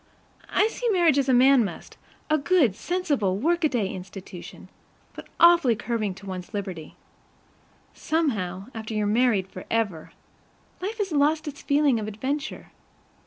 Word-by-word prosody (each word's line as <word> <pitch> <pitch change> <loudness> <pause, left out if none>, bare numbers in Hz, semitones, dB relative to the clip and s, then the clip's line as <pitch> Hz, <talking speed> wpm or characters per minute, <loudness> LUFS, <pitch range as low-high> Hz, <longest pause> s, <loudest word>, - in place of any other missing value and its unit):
I 420 - +3
see 475 +2 -3
marriage 340 -8 +4
as 270 -1 0
a - - +5
man 260 0 +6
must, 200 - -7 0.3
a 310 0 +2
good, 280 - +3
sensible 285 - -1
workaday 295 - +1
institution; 190 -1 -10 0.5
but - - -10
awfully 340 -8 +6
curbing 215 -3 -2
to 200 - -13
one's 185 +2 -7
liberty. 185 -6 -6 1.0
Somehow, 205 - -1
after 220 0 -6
you're 210 -1 0
married 215 -3 +2
forever, 190 -3 -3 0.7
life 420 +4 -4
has 405 -4 -2
lost 305 +2 +2
its 290 -1 -7
feeling 285 -4 +2
of 215 - -4
adventure. 270 +8 -4
245 Hz, 135 wpm, -25 LUFS, 200-310 Hz, 1.0 s, man